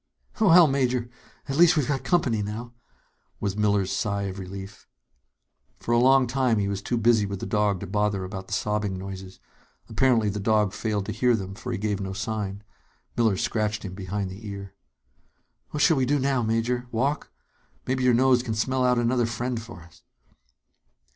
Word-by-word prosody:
"Well, 180 -5 +7
Major, 125 -4 0 0.4
at 135 0 -2
least 175 0 +6
we've 145 - +1
got 135 -3 -1
company 130 -8 +1
now," 110 +4 -5 0.7
was 100 -2 -2
Miller's 100 -2 +1
sigh 100 -1 -1
of 95 0 -5
relief. 95 +1 -9 0.9
For - - -4
a 120 - +4
long 130 +1 +5
time 125 -2 +1
he 100 -1 0
was 100 -1 -3
too 120 +4 -2
busy 115 -2 +3
with 100 -1 -5
the - - -5
dog 105 -2 +1
to - - -4
bother 105 0 0
about 95 0 -7
the - - -6
sobbing 105 -2 -1
noises. 95 0 -8 0.5
Apparently 115 -1 +2
the 105 +1 -3
dog 105 -1 +2
failed 105 -2 -2
to - - -4
hear 125 -1 +2
them, 95 -2 -5
for 125 +5 -6
he 115 - -2
gave 105 -1 -2
no 95 0 -4
sign. 105 -1 -4 0.5
Miller 110 -4 +2
scratched 110 +1 -1
him 95 - -6
behind 95 0 -4
the 105 +3 -9
ear. 100 -1 -7 1.0
"What 150 - -1
shall 165 -4 +5
we 130 -1 +1
do 145 +2 +2
now, 135 -2 +1
Major? 115 +2 -1
Walk? 135 +6 -1 0.5
Maybe 130 0 -1
your 125 -2 +4
nose 130 0 +4
can 115 -3 -3
smell 130 +4 0
out 125 -1 +3
another 120 0 +1
friend 120 0 -3
for 115 -7 -11
us." 85 - -19
110 Hz, 185 wpm, -25 LUFS, 100-125 Hz, 1.0 s, Well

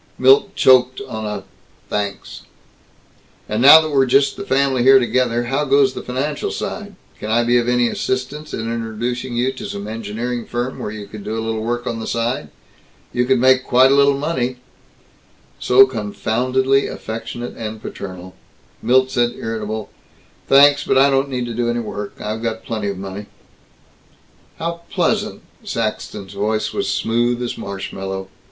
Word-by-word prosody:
Milt 135 +10 +4
choked 130 0 +4
on 110 -1 -5
a 105 -2 -4 0.4
"Thanks." 100 -1 -4 1.1
"And 110 +2 -1
now 145 +5 +10
that 155 -1 -4
we're 135 -2 +3
just 135 +2 +3
the 200 - -6
family 135 -6 +1
here 135 +2 +7
together 120 -1 +1
how 135 +5 -1
goes 135 -2 +3
the - - -6
financial 140 +4 -3
side? 205 -2 -5 0.2
Can 105 - -5
I 115 +2 +3
be 120 +1 +3
of 120 0 -1
any 125 -1 +3
assistance 130 +6 -3
in - - -4
introducing 115 +2 -3
you 125 +2 +1
to 130 - -7
some 100 +1 -6
engineering 115 +2 -4
firm 120 +2 -3
where - - -4
you 105 -1 -7
could 105 0 -10
do 110 +2 -4
a 110 - -3
little 110 -1 -2
work 120 +2 -2
on 115 -2 -3
the 110 - -5
side? 115 -9 -2 0.6
You 125 0 +1
could 130 +1 +3
make 130 +1 +4
quite 130 +2 +5
a - - +5
little 140 0 +4
money 130 -4 -2 0.6
" - - -34
So 130 +1 +8
confoundedly 130 +3 0
affectionate 120 +2 -6
and 110 -1 -6
paternal 95 -3 -8 0.5
Milt 130 +3 +3
said 120 -2 +1
irritably, 110 -1 -4 0.6
"Thanks, 140 +1 +6
but - - +1
I 140 +1 +5
don't 135 +1 +1
need 125 -2 -2
to 120 - -5
do 120 +1 -1
any 120 0 0
work. 105 -2 -6
I've 110 +1 -4
got 115 -1 -3
plenty 110 -3 -3
of 100 -1 -3
money." 95 +2 -7 1.3
"How 170 +1 -4
pleasant!" 205 +4 -1 0.2
Saxton's 110 - -4
voice 110 +1 -1
was - - -2
smooth 120 +1 0
as 120 - -3
marshmallow. 95 -1 -6
120 Hz, 170 wpm, -19 LUFS, 110-130 Hz, 1.3 s, now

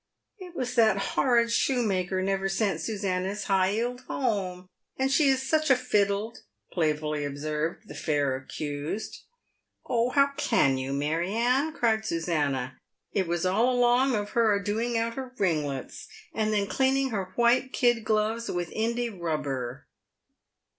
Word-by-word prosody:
" - - -56
It 360 -2 -10
was 250 -3 -3
that 220 -5 +4 0.2
horrid 235 -3 +3
shoemaker 195 -8 +1
never 195 0 0
sent 195 -4 0
Susannah's 195 0 -2
high 190 -1 +2
'eeled 245 +3 -2
home; 185 -7 -2 0.3
and 265 +1 +1
she 280 0 +4
is 265 0 +1
such 310 +1 +2
a 265 - +7
fiddle," 210 -3 0 0.4
playfully 150 -3 0
observed 150 +3 -3
the - - -9
fair 145 -3 0
accused. 145 +8 -5 0.6
"Oh! 235 0 +1
how 280 +1 +3
can 225 - +2
you, 130 +1 -3
Mary 160 +7 -1
Anne," 250 +7 +2
cried 220 -6 +1
Susannah. 150 - -1 0.3
"It 190 -3 0
was 170 +1 -1
all 215 +7 +3
along 245 +1 +3
of 205 -1 -3
her 225 -3 +3
a 200 - -2
doing 225 +3 -1
out 230 0 -1
her 260 -1 -6
ringlets, 150 -8 -2 0.3
and 215 -1 0
then 205 -2 +1
cleaning 265 +3 +1
her 190 -4 -3
white 240 +2 +3
kid 240 -4 +2
gloves 220 +2 0
with 175 -2 -3
Indey 235 +2 -1
rubber." 140 - -3
205 Hz, 150 wpm, -27 LUFS, 165-240 Hz, 0.6 s, a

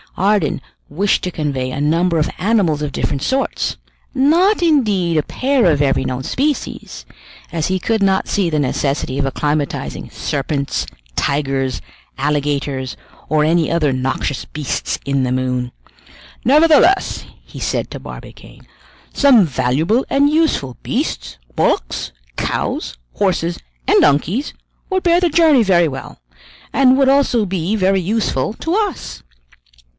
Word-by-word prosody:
Ardan 200 -6 +1 0.3
wished 195 +7 +1
to 180 - -2
convey 140 -5 -2
a 130 - -4
number 165 +4 +1
of 155 - +1
animals 190 -7 +1
of 150 -1 -2
different 135 - -2
sorts, 265 - -1 0.4
not 335 +10 +3
indeed 210 - +2
a 150 - +2
pair 265 - +1
of 145 -2 +1
every 135 -2 +2
known 130 0 -3
species, 285 - -3 0.5
as 160 -2 -1
he 185 0 0
could 220 +3 0
not 190 -1 +2
see 195 -4 0
the 155 -2 0
necessity 140 -1 -1
of 140 - +1
acclimatizing 145 +2 -2
serpents, 140 0 -2 0.3
tigers, 135 -3 -1 0.4
alligators, 140 -2 -1 0.3
or 155 -1 +3
any 165 +1 +2
other 155 -5 +1
noxious 130 -1 -2
beasts 150 -3 -3
in 140 -1 0
the 125 - -1
moon. 125 -1 -1 0.7
"Nevertheless," 310 +7 +4 0.2
he - - -11
said - - -2
to - - -6
Barbicane, - - -12 0.5
"some 260 -8 +5
valuable 150 - +1
and 280 +1 +3
useful 305 - +1
beasts, - - -3 0.2
bullocks, - - 0 0.2
cows, - - -3 0.2
horses, 175 -3 0 0.3
and - - +5
donkeys, 170 - +1 0.4
would 375 -1 0
bear 345 0 +4
the 355 -1 +2
journey 310 -6 +5
very 175 -4 +3
well, 135 - -7 0.5
and 260 -1 +5
would 275 -1 +3
also 270 -5 +3
be 185 +1 -1
very 195 -1 +2
useful 200 - -1
to 330 +8 -2
us." 415 -4 -3
170 Hz, 135 wpm, -18 LUFS, -, 0.7 s, some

